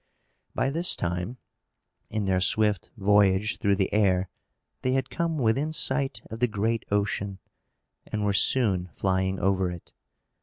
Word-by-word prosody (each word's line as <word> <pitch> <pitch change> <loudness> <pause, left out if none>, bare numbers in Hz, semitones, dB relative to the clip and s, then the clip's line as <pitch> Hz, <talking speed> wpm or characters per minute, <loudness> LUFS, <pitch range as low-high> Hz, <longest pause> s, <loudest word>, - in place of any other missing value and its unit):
By 135 - +1
this 170 +4 +3
time, 90 +7 -3 0.7
in 105 -1 -2
their 95 -1 +2
swift 105 0 +1
voyage 100 0 +3
through 100 -1 +2
the 95 -1 -1
air, 95 -3 +2 0.5
they 130 - 0
had 130 -1 -1
come 170 -2 -1
within 135 +5 +1
sight 135 -6 +1
of 110 - -6
the 125 - +3
great 110 +1 -1
ocean, 100 -1 -1 0.7
and 105 -1 -2
were 100 - +1
soon 100 -5 +2
flying 95 0 0
over 95 -1 +1
it. 90 -1 -10
105 Hz, 145 wpm, -26 LUFS, 95-115 Hz, 0.7 s, this